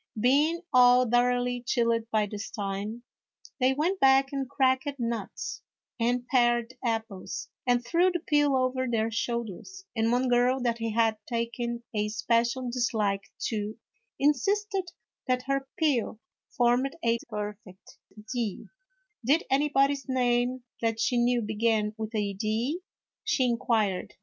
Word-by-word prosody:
Being 295 - +3
all 250 0 +6
thoroughly 245 +1 +2
chilled 230 -2 0
by 215 -2 +2
this 205 +1 -6
time, 205 +2 -4 0.6
they 255 0 +4
went 350 +7 0
back 270 0 +4
and 270 -2 -2
cracked 265 0 +2
nuts 235 -2 -4 0.4
and 245 +1 +1
pared 240 -1 +2
apples, 225 -5 -3 0.2
and 245 -1 +2
threw 345 +5 +3
the 350 -1 -2
peel 295 -3 +2
over 255 0 0
their 225 -1 0
shoulders; 235 - -4
and 225 0 +1
one 250 +2 +2
girl 245 +2 +3
that 235 -1 0
he 225 0 -2
had 225 -1 +2
taken 235 0 -3
a 210 -1 0
special 235 +4 0
dislike 215 -5 -1 0.2
to, 215 -1 -3 0.4
insisted 390 - +1 0.4
that 250 0 +1
her 275 0 -1
peel 280 -10 +1 0.3
formed 245 +2 +1
a 230 0 +2
perfect 210 -2 -7 0.4
I), 230 -5 -1 0.7
"did 290 +8 +3
anybody's 275 0 +2
name 250 0 +1 0.2
that 225 -1 0
she 225 +3 +1
knew 240 0 +2
begin 215 0 0
with 220 0 -5
a 205 -2 -1
I)?" 235 +11 -1 0.4
she 260 - +1
inquired. 225 -5 0
240 Hz, 135 wpm, -28 LUFS, 225-265 Hz, 0.7 s, all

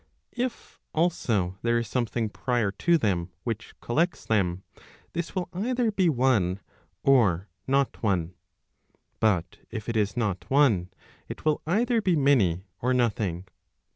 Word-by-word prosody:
If, 250 0 -4 0.2
also, 110 - 0
there 120 0 +2
is 115 -1 -1
something 120 -2 -1
prior 120 -2 0
to 170 - +2
them 95 - 0
which 115 -1 -4
collects 155 +4 0
them, 95 -4 +1 0.5
this 170 0 -4
will 185 -2 -1
either 235 +4 0
be 190 -4 +2
one, 120 - +2 0.4
or 105 -9 +3 0.2
not 135 0 +1
one. 90 -5 0 0.9
But 100 -7 +1
if 110 - -6
it 115 - -2
is 105 +1 0
not 105 -6 -2
one, 125 -11 +3 0.4
it - - -8
will 155 -1 +2
either 230 +6 +2
be 185 -4 +2
many 110 - +3 0.2
or 125 +1 +2
nothing. 105 -7 0
120 Hz, 140 wpm, -27 LUFS, 100-155 Hz, 0.9 s, or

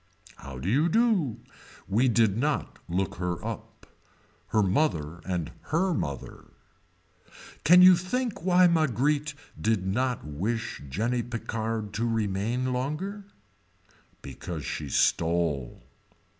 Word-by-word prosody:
How 65 0 -9
do 65 - -5
you 145 - +3
do. 210 - +2 0.5
We 115 +7 +2
did 110 -4 +3
not 145 +6 -1
look 90 +2 -1
her 90 +2 -3
up. 115 -2 -7 0.6
Her 110 - +2
mother 85 - 0
and 85 -3 -2 0.2
her 180 +4 +2
mother. 70 - -5 1.2
Can 180 +4 +8
you 185 0 +9
think 210 +3 -2
why 180 0 +5
Marguerite 150 -2 +1 0.3
did 110 -4 +1
not 125 +6 -1
wish 105 +11 -3
Jenny 120 - 0
Picard 115 -3 -4
to 115 +3 -1
remain 115 +4 -1
longer. 155 +11 -3 1.0
Because 85 -7 -6
she 75 +1 -4
stole. 80 -3 +1
115 Hz, 115 wpm, -27 LUFS, 95-150 Hz, 1.2 s, you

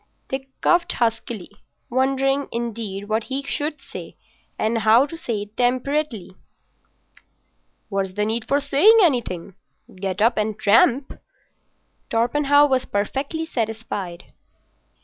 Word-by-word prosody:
Dick 265 0 -4
coughed 350 0 +3
huskily, 225 -4 -2 0.4
wondering, 270 +2 +1
indeed, 225 -4 -4
what 220 +1 -1
he 270 +1 -3
should 295 +2 -2
say, - - -9 0.4
and 225 +1 0
how 225 +4 +5
to 295 - -8
say 230 -10 -3
it 210 +1 -16
temperately. 250 -4 -1 1.6
"What's 195 -2 -2
the 210 +2 0
need 220 +1 -1
for 280 - +2
saying 290 +11 +5
anything? 220 - 0 0.4
Get 185 0 -4
up 230 +3 +3
and 215 0 -1
tramp." 230 +5 +3 0.9
Torpenhow 285 +5 +3
was 260 -2 +1
perfectly 275 +10 -2
satisfied. 220 - -4
235 Hz, 115 wpm, -22 LUFS, 210-275 Hz, 1.6 s, how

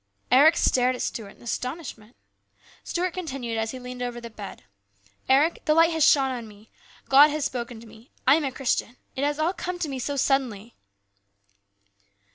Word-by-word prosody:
Eric 295 +6 +6
stared 255 0 +2
at - - -6
Stuart 205 -4 -5
in - - -19
astonishment. 250 -2 -6 0.7
Stuart 360 +1 -2
continued 270 -10 -4
as 220 0 -1
he 260 - -6
leaned 250 0 -8
over 245 -1 -4
the 235 -1 -9
bed: 210 -2 -9 0.3
" 100 - -38 0.2
Eric, 285 +5 +3
the 305 - +3
Light 330 +1 +5
has 320 -2 +1
shone 270 -2 +4
upon 240 -3 -6
me. 210 +1 -17 0.4
God 280 +2 +8
has 300 -1 -2
spoken 240 -2 -4
to 230 - -13
me. 220 +3 -16 0.2
I 265 - +7
am 315 +1 +2
a 270 - -2
Christian. 250 -2 -2 0.2
It 265 - -2
has 290 0 0
all 320 +4 0
come 360 0 -5
to 350 - -2
me 265 -2 -4
suddenly." 255 -5 -1
260 Hz, 185 wpm, -25 LUFS, 235-295 Hz, 0.7 s, God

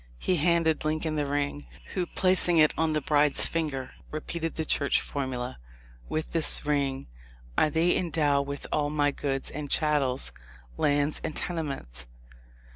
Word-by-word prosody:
He 180 - 0
handed 165 0 +2
Lincoln 155 +1 -1
the 145 -2 0
ring, 145 0 -2 0.3
who. 180 -2 -1
plac 185 0 +5
ing 170 - +4
it 155 -1 +5
on 160 -1 +1
the 150 - 0
bride's 145 0 +4
finger, 150 -6 -2 0.2
repeated 165 +2 -4
the 160 - -2
Church 140 -1 +2
formula, 130 -3 -4 0.5
'With 155 0 -3
this 165 -2 -1
ring 140 -2 0 0.5
I 155 - +3
thee 165 +4 +2
endow 150 -5 +1
with 140 0 -6
ail 145 -1 +1
my 145 -1 +2
goods 135 -1 -2
and 145 -1 -5
chattels, 140 -4 +1 0.4
lands 145 - +1
and 155 - -3
tenements.' 135 - -4
150 Hz, 150 wpm, -28 LUFS, 140-160 Hz, 0.5 s, plac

